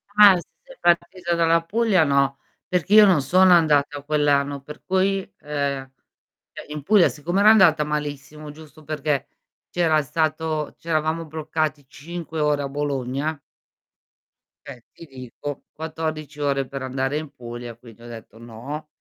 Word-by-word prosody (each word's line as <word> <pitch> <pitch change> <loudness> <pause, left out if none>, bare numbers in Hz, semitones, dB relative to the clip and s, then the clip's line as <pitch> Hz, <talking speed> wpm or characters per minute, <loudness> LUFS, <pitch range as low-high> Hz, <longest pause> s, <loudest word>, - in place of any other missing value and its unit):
Ah, 205 -2 +9 0.3
sei - - -16
partita 175 0 +1
dalla 165 0 +3
Puglia 205 -2 +2
o - - 0
no? 140 -1 +1 0.3
Perché 185 +2 -1
io 215 -1 +9
non 180 -7 +4
sono 185 +6 +5
andata 145 -3 +3
quell'anno, 145 -2 +1
per 150 +2 -12
cui, 190 +1 +1 0.2
ehm 140 -2 -3 0.7
cioè - - -8
in 150 -1 -6
Puglia 205 -2 +5
siccome 175 +6 -2
era 210 +1 +7
andata 175 -8 +5
malissimo, 150 0 -5
giusto 155 0 -15
perché 150 -2 -2 0.4
c'era 160 -3 +2
stato 155 +1 -2
c'eravamo 160 0 -1
bloccati 155 -1 -3
5 160 +3 -8
ore 150 -1 +1
a 140 - -3
Bologna 140 +1 -3 1.3
Eh, 130 -4 -10
ti 165 - -13
dico, 135 +1 -8
14 155 -1 -5
ore 140 -2 0
per 135 0 -7
andare 135 +2 -2
in 155 -2 -5
Puglia, 120 -2 -8
quindi 115 -1 -17
ho - - -11
detto: 115 -2 -11
"No." 120 +7 -8
150 Hz, 145 wpm, -23 LUFS, 140-165 Hz, 1.3 s, Ah